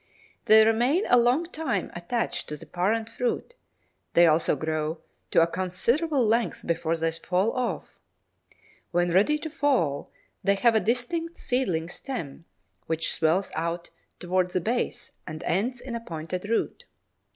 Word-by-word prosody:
They 220 Hz, 0 st, +7 dB
remain 245 Hz, -, +3 dB
a 245 Hz, -, +6 dB
long 245 Hz, +8 st, +3 dB
time 265 Hz, -, -2 dB
attached 225 Hz, +8 st, -3 dB
to 150 Hz, -, -4 dB
the -, -, -11 dB
parent 215 Hz, +5 st, 0 dB
fruit; 245 Hz, -, -2 dB, 0.6 s
they 175 Hz, -, +7 dB
also 160 Hz, -1 st, +3 dB
grow 155 Hz, +2 st, -2 dB, 0.3 s
to -, -, +5 dB
a -, -, +5 dB
considerable 235 Hz, -, 0 dB
length 230 Hz, +2 st, 0 dB
before 165 Hz, 0 st, 0 dB
they 165 Hz, 0 st, 0 dB
fall 180 Hz, +6 st, 0 dB
off. 250 Hz, -1 st, -3 dB, 0.9 s
When 175 Hz, 0 st, +1 dB
ready 205 Hz, -, +4 dB
to 315 Hz, +1 st, -5 dB
fall, 250 Hz, -, +1 dB, 0.3 s
they 200 Hz, 0 st, +3 dB
have 235 Hz, +4 st, +4 dB
a 220 Hz, -, +4 dB
distinct 255 Hz, +10 st, -1 dB
seedling 185 Hz, -11 st, 0 dB
stem, 170 Hz, -, -6 dB, 0.4 s
which 160 Hz, 0 st, 0 dB
swells 165 Hz, +5 st, +1 dB
out 170 Hz, +1 st, -3 dB, 0.3 s
towards 180 Hz, 0 st, 0 dB
the -, -, +2 dB
base 240 Hz, +6 st, -2 dB, 0.2 s
and 155 Hz, -1 st, -6 dB
ends 230 Hz, +9 st, 0 dB
in 250 Hz, 0 st, -7 dB
a 235 Hz, -, -2 dB
pointed 180 Hz, 0 st, -5 dB
root. 230 Hz, -, -1 dB
195 Hz, 150 wpm, -26 LUFS, 170-245 Hz, 0.9 s, They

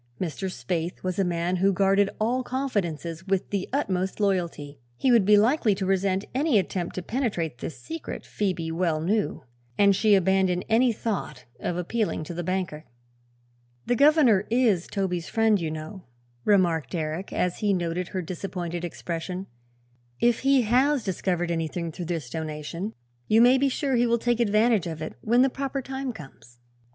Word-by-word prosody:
Mr. 185 Hz, +2 st, -3 dB
Spaythe 165 Hz, +6 st, -3 dB
was 185 Hz, 0 st, -2 dB
a -, -, +4 dB
man 175 Hz, 0 st, 0 dB
who 195 Hz, +2 st, +3 dB
guarded 195 Hz, +1 st, +3 dB
all 240 Hz, +4 st, +1 dB
confidences 185 Hz, -, -3 dB
with 195 Hz, -1 st, -1 dB
the 200 Hz, -2 st, -2 dB
utmost 190 Hz, -10 st, -1 dB
loyalty. 170 Hz, -8 st, -1 dB, 0.2 s
He 255 Hz, -, +2 dB
would 230 Hz, -5 st, +5 dB
be 210 Hz, +1 st, +6 dB
likely 220 Hz, -1 st, +3 dB
to 190 Hz, -, -3 dB
resent 190 Hz, +1 st, +1 dB
any 275 Hz, -1 st, +2 dB
attempt 180 Hz, -2 st, -2 dB
to 185 Hz, -, -4 dB
penetrate 175 Hz, -, -2 dB
this 160 Hz, -, -6 dB
secret, 325 Hz, 0 st, -7 dB
Phoebe 180 Hz, -5 st, -2 dB
well 165 Hz, -2 st, 0 dB
knew, 200 Hz, +3 st, -1 dB, 0.3 s
and 200 Hz, -1 st, +5 dB
she 210 Hz, +1 st, +4 dB
abandoned 190 Hz, -1 st, +2 dB
any 235 Hz, +3 st, +4 dB
thought 200 Hz, -, -4 dB
of 175 Hz, -, -2 dB
appealing 200 Hz, 0 st, -1 dB
to 165 Hz, -, -7 dB
the 175 Hz, +1 st, -4 dB
banker. 180 Hz, -4 st, -3 dB, 1.0 s
"The 245 Hz, -, +1 dB
governor 275 Hz, -8 st, +5 dB
is 225 Hz, -7 st, +2 dB
Toby's 180 Hz, -5 st, -2 dB
friend, 220 Hz, -1 st, +3 dB
you 160 Hz, -, -1 dB
know," 155 Hz, +5 st, -7 dB, 0.4 s
remarked 170 Hz, -, +2 dB
Eric, 160 Hz, +3 st, -3 dB
as 180 Hz, -1 st, -1 dB
he 210 Hz, -1 st, +1 dB
noted 175 Hz, -1 st, -1 dB
her 185 Hz, -1 st, -4 dB
disappointed 175 Hz, -1 st, -5 dB
expression. 175 Hz, +2 st, -4 dB, 0.7 s
"If 240 Hz, -1 st, +3 dB
he 270 Hz, -1 st, +3 dB
has 255 Hz, +4 st, +2 dB
discovered 175 Hz, -2 st, -1 dB
anything, 165 Hz, 0 st, -2 dB
through 175 Hz, +2 st, -6 dB
this 165 Hz, -6 st, -3 dB
donation, 160 Hz, +5 st, -5 dB, 0.3 s
you 220 Hz, -, +4 dB
may 250 Hz, +3 st, +6 dB
be 275 Hz, +1 st, +3 dB
sure 270 Hz, +1 st, -1 dB
he 240 Hz, 0 st, +3 dB
will 235 Hz, 0 st, +3 dB
take 240 Hz, 0 st, 0 dB
advantage 215 Hz, -3 st, +3 dB
of 160 Hz, -2 st, -5 dB
it 155 Hz, -, -5 dB
when 240 Hz, +3 st, +4 dB
the 270 Hz, -, +3 dB
proper 275 Hz, 0 st, -3 dB
time 265 Hz, 0 st, -4 dB
comes." 135 Hz, -, -13 dB
190 Hz, 170 wpm, -26 LUFS, 170-225 Hz, 1.0 s, be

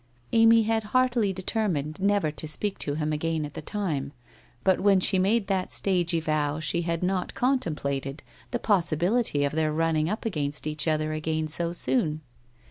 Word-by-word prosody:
Amy 225 Hz, 0 st, +6 dB
had 225 Hz, +1 st, +1 dB, 0.2 s
heartily 240 Hz, -5 st, +2 dB
determined 185 Hz, -6 st, -2 dB
never 200 Hz, -5 st, +2 dB
to 155 Hz, +1 st, -5 dB
speak 200 Hz, +6 st, -1 dB
to 145 Hz, -, -2 dB
him 155 Hz, 0 st, -1 dB
again 160 Hz, 0 st, -1 dB
at 145 Hz, -, -9 dB
the -, -, -6 dB
time, 150 Hz, -10 st, -3 dB, 0.5 s
but 190 Hz, -1 st, +3 dB
when 200 Hz, -1 st, +4 dB
she 190 Hz, +1 st, +3 dB
made 205 Hz, +3 st, +2 dB
that 190 Hz, -2 st, -1 dB
stagey 175 Hz, -3 st, +1 dB
vow 155 Hz, -1 st, -1 dB
she 160 Hz, +2 st, -1 dB
had 170 Hz, 0 st, -2 dB
not 185 Hz, 0 st, -1 dB
contemplated 150 Hz, -, -1 dB, 0.3 s
the 245 Hz, -, -1 dB
possibility 180 Hz, -3 st, +1 dB
of 140 Hz, -, 0 dB
their 155 Hz, 0 st, +1 dB
running 160 Hz, 0 st, +1 dB
up 215 Hz, -, -4 dB
against 150 Hz, -9 st, -2 dB
each 155 Hz, +1 st, -2 dB
other 155 Hz, 0 st, 0 dB
again 155 Hz, 0 st, -2 dB
so 170 Hz, +2 st, -1 dB
soon. 155 Hz, 0 st, 0 dB
165 Hz, 170 wpm, -26 LUFS, 155-200 Hz, 0.5 s, Amy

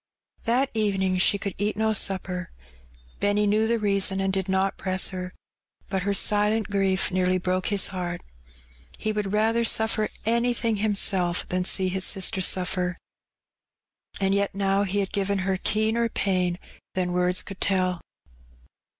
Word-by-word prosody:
That 255 Hz, +4 st, +1 dB
evening 195 Hz, -4 st, 0 dB
she 200 Hz, -, +4 dB
could 200 Hz, -1 st, -4 dB
eat 210 Hz, +1 st, -1 dB
no 220 Hz, 0 st, +1 dB
supper. 185 Hz, -3 st, -1 dB, 0.7 s
Benny 205 Hz, +1 st, +2 dB
knew 215 Hz, +2 st, +2 dB
the 235 Hz, +1 st, +2 dB
reason 195 Hz, -2 st, +1 dB
and 195 Hz, 0 st, 0 dB
did 190 Hz, -1 st, -2 dB
not 190 Hz, +1 st, +1 dB
press 185 Hz, 0 st, 0 dB
her, 185 Hz, -1 st, -6 dB, 0.6 s
but 190 Hz, -2 st, -1 dB
her 200 Hz, +2 st, 0 dB
silent 210 Hz, +1 st, +2 dB
grief 195 Hz, -1 st, +2 dB
nearly 185 Hz, 0 st, +1 dB
broke 185 Hz, 0 st, -1 dB
his 205 Hz, -2 st, +2 dB
heart. 175 Hz, -2 st, -4 dB, 0.7 s
He 215 Hz, -, -2 dB
would 210 Hz, -2 st, -2 dB
rather 225 Hz, +2 st, +2 dB
suffer 220 Hz, -1 st, +1 dB, 0.2 s
anything 235 Hz, -1 st, +1 dB
himself 195 Hz, -4 st, +1 dB
than 180 Hz, 0 st, 0 dB
see 190 Hz, 0 st, +1 dB
his 190 Hz, 0 st, 0 dB
sister 190 Hz, 0 st, 0 dB
suffer. 180 Hz, 0 st, 0 dB, 1.2 s
And 195 Hz, 0 st, +1 dB
yet 200 Hz, -1 st, 0 dB
now 195 Hz, 0 st, +1 dB
he 200 Hz, +1 st, 0 dB
had 195 Hz, -, -4 dB
given 200 Hz, 0 st, 0 dB
her 190 Hz, -1 st, 0 dB
keener 220 Hz, +4 st, +1 dB
pain 180 Hz, -4 st, 0 dB, 0.4 s
than 180 Hz, -1 st, -1 dB
words 180 Hz, 0 st, +1 dB
could 195 Hz, -1 st, -10 dB
tell. 185 Hz, -2 st, +1 dB
195 Hz, 150 wpm, -25 LUFS, 185-210 Hz, 1.2 s, she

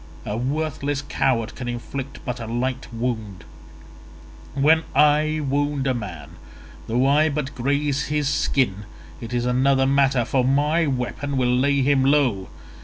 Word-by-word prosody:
A 105 Hz, -, -3 dB
worthless 145 Hz, +2 st, -2 dB
coward 120 Hz, -5 st, 0 dB
can 125 Hz, -, -7 dB
inflict 125 Hz, +3 st, -6 dB
but 125 Hz, -2 st, -4 dB
a 115 Hz, -, -6 dB
light 125 Hz, +3 st, -3 dB
wound; 115 Hz, -5 st, -4 dB, 1.1 s
when 155 Hz, +4 st, +4 dB
I 150 Hz, +2 st, +3 dB
wound 145 Hz, 0 st, 0 dB
a 130 Hz, -, +2 dB
man 100 Hz, -10 st, -7 dB, 0.5 s
though 120 Hz, +3 st, +1 dB
I 150 Hz, +3 st, +4 dB
but 145 Hz, -1 st, -3 dB
graze 140 Hz, +2 st, 0 dB
his 150 Hz, 0 st, 0 dB
skin 105 Hz, -7 st, 0 dB, 0.3 s
it 115 Hz, -, -7 dB
is 120 Hz, 0 st, -1 dB
another 135 Hz, +2 st, +2 dB
matter, 135 Hz, -2 st, +2 dB
for 130 Hz, +1 st, +1 dB
my 150 Hz, +5 st, +2 dB
weapon 135 Hz, +2 st, -3 dB
will 125 Hz, -1 st, +2 dB
lay 140 Hz, +2 st, +2 dB
him 135 Hz, -1 st, +3 dB
low. 130 Hz, -9 st, +2 dB
135 Hz, 145 wpm, -22 LUFS, 120-145 Hz, 1.1 s, when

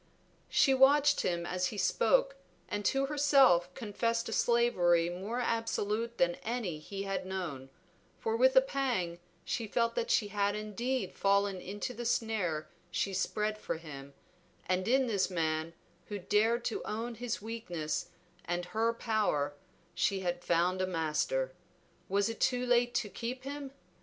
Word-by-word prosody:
She 270 Hz, -, +4 dB
watched 285 Hz, +2 st, +5 dB
him 170 Hz, -1 st, -1 dB
as 180 Hz, +1 st, 0 dB
he 210 Hz, -, -6 dB
spoke, -, -, +2 dB, 0.3 s
and 205 Hz, 0 st, -3 dB
to 270 Hz, 0 st, +2 dB
herself 275 Hz, -11 st, +4 dB
confessed 230 Hz, 0 st, -1 dB
a -, -, -3 dB
slavery 175 Hz, -10 st, +3 dB
more 200 Hz, +7 st, -4 dB
absolute 230 Hz, -1 st, -1 dB
than 175 Hz, 0 st, +2 dB
any 220 Hz, -9 st, -3 dB
he 195 Hz, +5 st, -6 dB
had 195 Hz, 0 st, -2 dB
known, 175 Hz, -9 st, -5 dB, 0.5 s
for 450 Hz, -1 st, -1 dB
with -, -, +4 dB
a -, -, +9 dB
pang 245 Hz, -, -1 dB, 0.3 s
she 230 Hz, -, -2 dB
felt 230 Hz, +2 st, +1 dB
that 475 Hz, 0 st, -2 dB
she 220 Hz, -, +2 dB
had 205 Hz, 0 st, 0 dB
indeed 215 Hz, +1 st, -2 dB
fallen 200 Hz, -1 st, +1 dB
into 205 Hz, +6 st, -5 dB
the 240 Hz, +1 st, -6 dB
snare 200 Hz, -10 st, 0 dB, 0.2 s
she 195 Hz, -, -1 dB
spread 210 Hz, +3 st, -1 dB
for 165 Hz, -, -3 dB
him, 140 Hz, -4 st, -10 dB, 0.5 s
and 185 Hz, +1 st, 0 dB
in 260 Hz, +2 st, +4 dB
this 200 Hz, -6 st, +1 dB
man, 160 Hz, -2 st, -1 dB, 0.4 s
who 205 Hz, -, -4 dB
dared 220 Hz, +5 st, +1 dB
to 225 Hz, -, -2 dB
own 225 Hz, +3 st, -3 dB
his 235 Hz, 0 st, -3 dB
weakness 205 Hz, -8 st, -4 dB, 0.4 s
and 175 Hz, +1 st, -2 dB
her 225 Hz, +1 st, +2 dB
power, 205 Hz, -12 st, 0 dB, 0.4 s
she 195 Hz, -1 st, +1 dB
had 175 Hz, -1 st, -2 dB
found 175 Hz, +2 st, +2 dB
a 185 Hz, -, +1 dB
master. 180 Hz, -, -1 dB, 0.6 s
Was 200 Hz, +2 st, +2 dB
it 225 Hz, -1 st, -5 dB
too 250 Hz, -1 st, +1 dB
late 245 Hz, 0 st, +2 dB
to 215 Hz, -, +1 dB
keep 245 Hz, +5 st, -5 dB
him? 280 Hz, 0 st, -5 dB
210 Hz, 155 wpm, -32 LUFS, 180-240 Hz, 0.6 s, a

